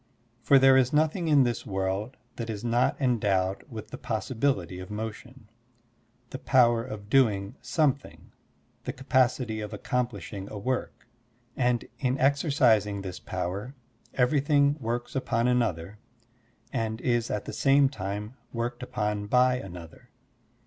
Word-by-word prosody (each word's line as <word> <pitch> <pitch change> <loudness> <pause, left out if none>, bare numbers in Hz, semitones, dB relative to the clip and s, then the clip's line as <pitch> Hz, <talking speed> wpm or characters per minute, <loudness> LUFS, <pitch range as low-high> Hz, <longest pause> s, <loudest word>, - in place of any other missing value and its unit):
For 135 +5 +5
there 135 0 +6
is 130 -1 +3
nothing 160 +3 +1
in 145 -3 +5
this 120 -2 -1
world 95 +4 -3 0.2
that 115 -1 -4
is 105 -1 -5
not 120 +1 +1
endowed 100 -7 +1
with 110 -3 -8
the - - -7
possi 115 +3 -3
bility 95 -8 0
of 90 - -9
motion, 110 +3 -7 0.8
the 130 - -5
power 120 -3 +4
of 105 -3 -8
doing 105 -4 +2
something, 145 -5 -1 0.5
the - - -3
capacity 125 -4 +1
of 105 0 -5
accomplishing 105 -4 -3
a 105 - -7
work; 125 +5 -3 0.5
and 125 -2 +1
in 130 -1 0
exercising 130 - +2
this 95 -2 -6
power 100 +9 -4 0.4
everything 140 +2 +3
works 120 +1 -3
upon 120 -2 0
another 105 -6 0 0.7
and 110 -1 -2
is 120 -2 0
at 105 - -3
the - - -6
same 140 0 +4
time 105 -3 -5 0.2
worked 120 +1 -3
upon 105 -5 -2
by 125 +2 +4
another. 90 -7 -10
120 Hz, 135 wpm, -27 LUFS, 105-130 Hz, 0.8 s, there